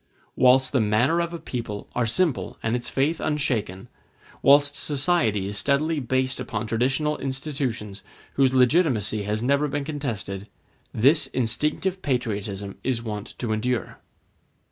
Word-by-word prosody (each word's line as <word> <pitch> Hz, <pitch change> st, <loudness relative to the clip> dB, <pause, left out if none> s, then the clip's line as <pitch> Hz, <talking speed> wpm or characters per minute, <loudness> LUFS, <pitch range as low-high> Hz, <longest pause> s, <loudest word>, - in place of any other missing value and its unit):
Whilst 130 Hz, +1 st, +5 dB
the 135 Hz, -, +2 dB
manners 120 Hz, +11 st, +2 dB
of 170 Hz, -, -10 dB
a 170 Hz, -, -4 dB
people 115 Hz, -9 st, -5 dB
are 120 Hz, -1 st, 0 dB
simple 160 Hz, +4 st, 0 dB
and 110 Hz, +2 st, 0 dB
its 120 Hz, -1 st, -3 dB
faith 150 Hz, +5 st, 0 dB
unshaken, 115 Hz, -11 st, -1 dB, 0.5 s
whilst 145 Hz, +1 st, +5 dB
society 140 Hz, -, +1 dB
is 105 Hz, +1 st, -1 dB
steadily 150 Hz, +3 st, +1 dB
based 130 Hz, 0 st, -1 dB
upon 110 Hz, -3 st, -3 dB
traditional 135 Hz, +7 st, 0 dB
institutions 130 Hz, -7 st, -3 dB, 0.3 s
whose 135 Hz, -2 st, +3 dB
legitimacy 125 Hz, -, +2 dB
has 105 Hz, +2 st, -2 dB
never 140 Hz, +3 st, +2 dB
been 145 Hz, 0 st, -2 dB
contested, 110 Hz, -10 st, -4 dB, 0.4 s
this 140 Hz, +8 st, +3 dB
instinctive 150 Hz, +10 st, -1 dB
patriotism 105 Hz, -6 st, -3 dB
is 120 Hz, -3 st, -1 dB
wont 105 Hz, -3 st, -6 dB
to 120 Hz, -3 st, -3 dB
endure. 115 Hz, 0 st, -2 dB
130 Hz, 135 wpm, -24 LUFS, 110-145 Hz, 0.5 s, Whilst